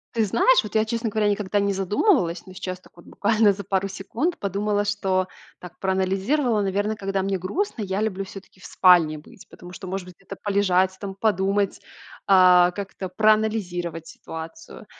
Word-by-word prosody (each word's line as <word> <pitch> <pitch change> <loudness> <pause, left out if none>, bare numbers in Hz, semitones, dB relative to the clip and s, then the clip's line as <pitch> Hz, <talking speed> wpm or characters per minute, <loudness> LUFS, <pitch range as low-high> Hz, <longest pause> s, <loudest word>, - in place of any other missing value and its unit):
Ты 225 -2 +2
знаешь, 235 - +4
вот 210 - -9
я, 220 0 +3
честно 230 0 -2
говоря, 210 0 0
никогда 205 0 0
не 200 0 +1
задумывалась, 195 - +1
но 185 - -12
сейчас 185 -1 -6
так - - -22
буквально 215 0 +2
за 200 +1 -6
пару 195 0 -1
секунд 245 - -3
подумала, 205 +1 -1
что 190 -2 0 0.3
так 180 -1 -12
проанализировала, 195 +6 0
наверно, 205 +2 -1
когда 195 -1 -2
мне 195 -1 -1
грустно, 235 - -3
я 195 0 -2
люблю 195 -3 -2
всё-таки 195 0 -12
в - - -14
спальне 170 -5 +4
быть, 150 - -15
потому 180 0 -12
что, 185 - -9
может 190 0 -4
быть, 180 - -12
это 195 - -9
полежать, 190 -2 +2
там 195 -2 -6
подумать, 200 -1 0 0.5
э, 180 -2 +6
как-то 195 -2 -6
проанализировать 190 -6 0
ситуацию. 165 - -10
195 Hz, 170 wpm, -23 LUFS, 185-210 Hz, 0.5 s, э